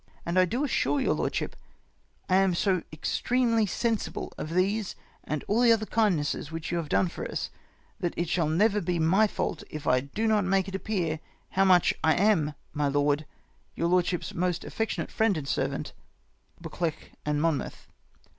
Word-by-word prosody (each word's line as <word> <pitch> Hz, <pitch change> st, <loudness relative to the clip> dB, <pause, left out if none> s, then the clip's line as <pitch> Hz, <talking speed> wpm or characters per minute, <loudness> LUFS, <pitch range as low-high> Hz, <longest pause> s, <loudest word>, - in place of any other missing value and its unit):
And 175 Hz, +2 st, +2 dB
I 185 Hz, -, +6 dB
do 240 Hz, +10 st, -1 dB
assure 290 Hz, +1 st, +1 dB
your 260 Hz, -, +2 dB
lordship, -, -, -2 dB, 0.7 s
I 185 Hz, -, +4 dB
am 190 Hz, -2 st, +3 dB
so 185 Hz, 0 st, +2 dB
extremely 230 Hz, +7 st, +1 dB
sensible 225 Hz, +3 st, -2 dB
of 160 Hz, +2 st, -5 dB
these 200 Hz, +2 st, +1 dB, 0.3 s
and 150 Hz, -2 st, -3 dB
all 220 Hz, +4 st, +2 dB
other 230 Hz, -2 st, +6 dB
the 215 Hz, -, -5 dB
kindnesses 175 Hz, -10 st, 0 dB
which 165 Hz, 0 st, -5 dB
3'0ii 175 Hz, -, 0 dB
have 165 Hz, -3 st, -3 dB
done 185 Hz, -, +3 dB
for 170 Hz, -, -6 dB
us, -, -, -3 dB, 0.5 s
that 175 Hz, -4 st, -2 dB
it 170 Hz, -, 0 dB
shall 165 Hz, -2 st, +1 dB
never 205 Hz, +6 st, +3 dB
be 175 Hz, +1 st, -1 dB
my 185 Hz, +7 st, +4 dB
fault 170 Hz, -, -3 dB
if 155 Hz, -1 st, -7 dB
I 125 Hz, -, +4 dB
do 140 Hz, -, -3 dB
not 215 Hz, -2 st, +3 dB
make 190 Hz, 0 st, +1 dB
it 195 Hz, -, -7 dB
appear 185 Hz, -6 st, -1 dB, 0.3 s
how 195 Hz, +1 st, +2 dB
much 180 Hz, -2 st, +5 dB
I 160 Hz, -, +4 dB
am, 175 Hz, -7 st, +2 dB, 0.2 s
my 145 Hz, -1 st, 0 dB
lord, 145 Hz, +1 st, +1 dB, 0.2 s
" -, -, -38 dB
Your 170 Hz, -, 0 dB
lordship's 180 Hz, -1 st, +1 dB
most 180 Hz, -1 st, -1 dB
affectionate 225 Hz, 0 st, -3 dB
friend 220 Hz, -5 st, +2 dB
and 140 Hz, -3 st, -5 dB
servant, -, -, -2 dB, 0.3 s
" -, -, -33 dB
BuccLEUCH 165 Hz, -3 st, -4 dB
and 150 Hz, 0 st, 0 dB
Monmouth. 160 Hz, -2 st, -1 dB
180 Hz, 185 wpm, -28 LUFS, 160-210 Hz, 0.7 s, I